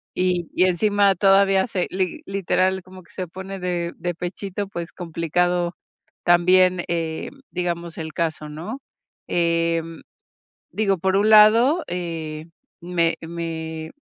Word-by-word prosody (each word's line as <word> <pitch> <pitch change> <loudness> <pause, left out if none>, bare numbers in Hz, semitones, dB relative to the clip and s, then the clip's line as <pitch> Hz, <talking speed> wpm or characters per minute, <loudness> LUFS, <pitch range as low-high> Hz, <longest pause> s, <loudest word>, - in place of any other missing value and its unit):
Y 180 -2 0
y 185 - +4
encima 200 +2 +3
todavía 195 +1 +4
se 185 -5 -1
li 185 -2 -2
literal, 190 -1 0
como 185 0 -13
que - - -23
se 185 -1 -4
pone 190 +3 -7
de 175 -1 -2
de 175 -1 -3
pechito, 195 +3 -4
pues, 170 -3 -6
complicado 175 +1 -1 0.5
también, 180 +1 +4
eh, 165 -2 -2 0.2
digamos, 170 -2 -3
el 160 -1 -6
caso, 160 -2 -2
¿no? 205 - -7 0.5
Eh, 170 -1 +1 0.9
digo, 195 0 +1
por 190 +2 +1
un 210 +2 +3
lado, 230 +10 +6
eh, 165 -3 -5 0.3
me 170 -1 0
me, 160 -1 -5
180 Hz, 130 wpm, -22 LUFS, 170-190 Hz, 0.9 s, lado